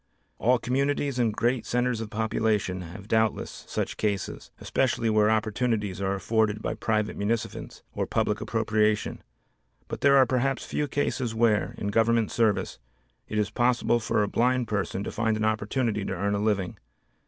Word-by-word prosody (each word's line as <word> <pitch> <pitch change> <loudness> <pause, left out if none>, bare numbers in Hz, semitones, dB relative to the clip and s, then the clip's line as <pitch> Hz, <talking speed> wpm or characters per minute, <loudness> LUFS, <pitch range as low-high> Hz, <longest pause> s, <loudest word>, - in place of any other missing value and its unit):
All 125 +5 +4
communities 140 +2 0
and 115 -2 +2
great 120 +3 0
centers 125 -1 0
of 110 - -5
population 110 -4 0
have 90 +4 -9
doubtless 110 -1 0
such - - -3
cases, 100 -2 -2
especially 120 -3 0
where 105 0 +4
opportunities 110 -3 0
are 95 0 0
afforded 110 +1 +1
by - - -2
private 110 -1 -1
munificence 110 +2 -3
or - - -2
public 105 0 0
appropriation, 110 -1 0 0.7
but - - -6
there 140 0 +6
are 130 - +7
perhaps 130 +2 0
few 150 - -2
cases 130 -5 -1
where, 110 -2 +2
in 100 - -2
Government 115 +1 +2
service, 110 -3 +1 0.5
it 110 - -4
is 105 -1 0
possible 120 0 +2
for 110 -1 +1
a - - 0
blind 125 +3 +1
person 100 -2 -2
to - - -4
find 110 -1 0
an 110 - 0
opportunity 110 0 0
to 100 - -3
earn 100 +3 -1
a 100 - 0
living. 100 -4 -1
110 Hz, 165 wpm, -27 LUFS, 105-120 Hz, 0.7 s, are